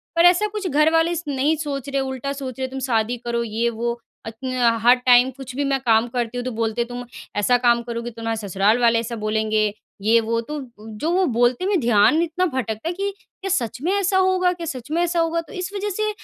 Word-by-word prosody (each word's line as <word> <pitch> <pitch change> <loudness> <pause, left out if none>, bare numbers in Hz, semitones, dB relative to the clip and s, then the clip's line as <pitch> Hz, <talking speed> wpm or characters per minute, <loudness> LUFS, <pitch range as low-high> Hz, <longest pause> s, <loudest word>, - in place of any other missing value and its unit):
पर 335 +1 +5
ऐसा 360 +4 +5
कुछ 415 -3 -3
घर 305 0 +3
वाले 325 +1 +3
नहीं 285 +2 +1
सोच 285 -3 -4
रहे, 275 0 0
उल्टा 265 +1 -3
सोच 265 -2 -7
रहे, 260 - -1
"तुम 265 +1 -6
शादी 225 +2 +1
करो, 235 0 -2
ये, 230 +1 -1
वो।" 235 +1 -3 0.3
अत्न 225 +4 -6
अ, 240 -2 +4
हर 245 +2 +7
टाइम 250 0 +5
कुछ 255 -2 -8
भी 285 - 0
मैं 275 -1 +1
काम 225 0 +4
करती 240 0 -3
हूँ, 245 - -2
तो 255 - -2
बोलते 225 0 -1
हैं, 235 - -2
"तुम 245 0 -6 0.3
ऐसा 245 +4 +3
काम 240 -1 +3
करोगी, 235 0 -5
तुम्हारे 225 0 -3
ससुराल 200 +5 +2
वाले 230 -1 +4
ऐसा 230 +1 -4
बोलेंगे, 215 0 +1 0.4
ये, 225 +3 +4
वो।" 230 +1 -1
तो 300 +6 -6 0.2
उ, 215 +1 -13
जो 305 +8 -1
वो 370 +1 +3
बोलते 245 +8 +2
में 390 -2 +2
ध्यान 235 +4 +4
इतना 340 +2 0
भटकता 255 -4 -3
है - - -2
कि 395 +3 -2 0.3
क्या 390 - -3
सच 250 - -1
में 340 +5 0
ऐसा 395 -1 +1
होगा, 370 -1 +3
क्या 340 -1 -7
सच 265 -3 -6
में 335 +2 +1
ऐसा 345 0 0
होगा? 335 0 +1
तो 320 - -14
इस 370 +1 -4
वजह 405 +1 -2
से 430 +2 -1
255 Hz, 240 wpm, -22 LUFS, 230-330 Hz, 0.4 s, हर